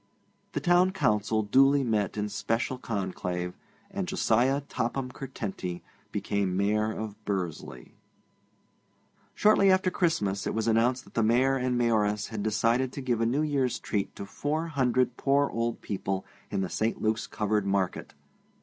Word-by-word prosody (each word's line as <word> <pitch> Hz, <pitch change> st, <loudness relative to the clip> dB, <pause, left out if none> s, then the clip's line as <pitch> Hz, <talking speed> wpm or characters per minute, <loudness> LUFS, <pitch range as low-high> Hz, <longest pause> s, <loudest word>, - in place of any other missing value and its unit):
The -, -, 0 dB
Town 175 Hz, +1 st, +4 dB
Council 110 Hz, -, +1 dB
duly 135 Hz, +6 st, +4 dB
met 105 Hz, -5 st, 0 dB
in 105 Hz, 0 st, -1 dB
special 115 Hz, +5 st, -2 dB
conclave, 90 Hz, -5 st, -3 dB, 0.4 s
and 195 Hz, -1 st, -3 dB
Josiah 135 Hz, -6 st, +2 dB
Topham 130 Hz, -1 st, -3 dB
Curtenty 105 Hz, -9 st, -5 dB, 0.3 s
became 100 Hz, -3 st, -1 dB
Mayor 105 Hz, +2 st, +1 dB
of 110 Hz, -1 st, -6 dB
Bursley. 95 Hz, -6 st, -4 dB, 1.4 s
Shortly 210 Hz, -2 st, +5 dB
after 185 Hz, -1 st, +3 dB
Christmas 105 Hz, -, 0 dB
it -, -, -2 dB
was 110 Hz, 0 st, -1 dB
announced 120 Hz, +3 st, +2 dB
that -, -, -19 dB
the 115 Hz, -, +1 dB
Mayor 125 Hz, +5 st, +3 dB
and 125 Hz, -1 st, 0 dB
Mayoress 105 Hz, -3 st, +1 dB
had 110 Hz, -2 st, -4 dB
decided 115 Hz, +4 st, +1 dB
to 140 Hz, -, -5 dB
give 120 Hz, -3 st, 0 dB
a 115 Hz, -, +3 dB
New 140 Hz, +6 st, +1 dB
Year's 140 Hz, -4 st, 0 dB
treat 100 Hz, -2 st, -3 dB
to 100 Hz, -, -6 dB
four 155 Hz, +10 st, -2 dB
hundred 130 Hz, -3 st, +1 dB
poor 140 Hz, +1 st, +2 dB
old 115 Hz, 0 st, -2 dB
people 95 Hz, -1 st, -3 dB, 0.2 s
in 95 Hz, -, -1 dB
the 95 Hz, -, -2 dB
St. 110 Hz, +1 st, -1 dB
Luke's 110 Hz, +1 st, 0 dB
covered 105 Hz, -2 st, 0 dB
market. 95 Hz, -2 st, -1 dB
115 Hz, 150 wpm, -28 LUFS, 105-135 Hz, 1.4 s, Shortly